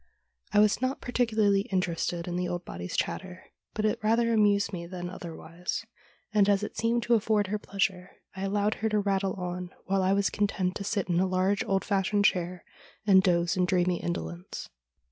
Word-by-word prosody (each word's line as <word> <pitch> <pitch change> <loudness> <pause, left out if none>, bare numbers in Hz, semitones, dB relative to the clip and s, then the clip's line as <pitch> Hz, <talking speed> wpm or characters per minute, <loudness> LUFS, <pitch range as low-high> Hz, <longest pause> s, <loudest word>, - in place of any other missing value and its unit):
I - - +1
was 210 +2 +4
not 260 +1 0
particu 245 -3 -1
larly 200 0 +3
interested 175 -2 -1
in 175 - -3
the 180 0 -1
old 175 0 -4
body's 85 +1 -5
chatter, 185 0 -3 0.3
but 215 - 0
it 215 +2 +1
rather 230 +2 +3
amused 205 -2 +3
me 170 -1 -5
than 180 0 -6
otherwise, 170 +2 -6 0.5
and, 205 -1 +4
as 200 0 +3
it - - -5
seemed 230 +1 +1
to 235 - +2
afford 215 -2 +2
her 210 +1 -1
pleasure, 190 -2 -1 0.3
I 190 - -6
allowed 205 +2 +1
her 220 - +1
to 215 - +1
rattle 195 -2 +1
on, 180 -1 -4 0.2
while 195 0 +1
I 190 +1 +3
was 200 0 +2
content 195 -3 0
to 200 - -5
sit 200 -1 -1
in 175 -1 +1
a 190 - +2
large 185 +2 +1
old 195 -1 0
fashioned 205 0 +1
chair 180 -2 0 0.4
and 190 -2 +7
dose 175 -1 +2
in 180 -1 +2
dreamy 180 -1 +1
indolence. 85 - -5
195 Hz, 195 wpm, -28 LUFS, 180-210 Hz, 0.5 s, and